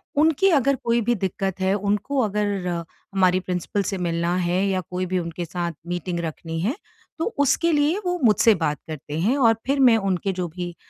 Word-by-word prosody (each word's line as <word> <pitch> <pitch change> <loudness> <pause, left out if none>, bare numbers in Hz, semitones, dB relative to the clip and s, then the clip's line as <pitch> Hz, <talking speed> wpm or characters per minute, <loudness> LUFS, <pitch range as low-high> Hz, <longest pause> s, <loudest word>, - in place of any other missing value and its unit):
उनकी 320 +6 +4
अगर 275 -4 +3
कोई 235 0 +2
भी 240 +2 +1
दिक्कत 190 -1 -3
है, 190 +1 +1
उनको 205 +7 -1
अगर 205 -2 0 0.6
हमारी 185 -1 +3
प्रिंसिपल 185 +2 -2
से 195 0 -3
मिलना 170 0 -1
है 180 +2 +1
या 185 -1 0
कोई 185 0 -2
भी 185 0 -1
उनके 170 0 -4
साथ 170 +1 -3 0.2
मीटिंग 175 0 -3
रखनी 165 0 -5
है, 230 - 0 0.4
तो 325 - 0
उसके 285 +4 +3
लिए 300 +4 +2
वो 355 0 0
मुझसे 220 +1 +5
बात 150 -3 -1
करते 155 -1 -6
हैं 230 +11 +2
और 230 -4 +5
फ़िर 275 +2 +1
मैं 250 -4 +6
उनके 195 -1 -1
जो 180 -1 -3
भी 175 +1 -6
190 Hz, 195 wpm, -23 LUFS, 175-235 Hz, 0.6 s, मैं